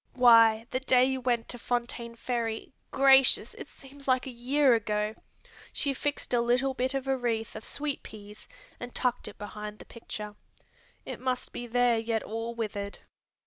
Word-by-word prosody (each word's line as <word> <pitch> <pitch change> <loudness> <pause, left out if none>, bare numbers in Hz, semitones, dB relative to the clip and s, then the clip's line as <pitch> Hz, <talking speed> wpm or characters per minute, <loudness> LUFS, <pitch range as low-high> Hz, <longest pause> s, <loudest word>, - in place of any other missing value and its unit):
"Why, 230 -3 +6
the 255 - 0
day 255 -1 +4
you 265 0 -1
went 240 -2 0
to 245 - -6
Fontaine 235 -1 -3
Ferry 230 -1 -3 0.2
gracious, 270 -1 +5
it - - -9
seems 275 +1 -14
a 255 -1 +4
year 260 +2 +2
ago! 210 -1 0 0.6
she 280 - 0
fixed 290 -1 -3
a 240 - +4
little 250 +3 +1
bit 260 +1 -1
of 270 0 -3
a 270 - +2
wreath 230 -3 -2
of - - -7
sweet 290 -1 -3
peas 210 -1 -12 0.3
and 245 0 -8
tucked 250 -1 -1
it - - -10
behind 210 0 -7
the - - -13
picture. 210 -2 -8 0.7
It - - -6
must 255 -1 -2
be 240 - -6
there 240 -1 +2
yet 225 -1 -1
all 225 +2 -5
withered." 205 -3 -4
240 Hz, 170 wpm, -28 LUFS, 225-260 Hz, 0.7 s, Why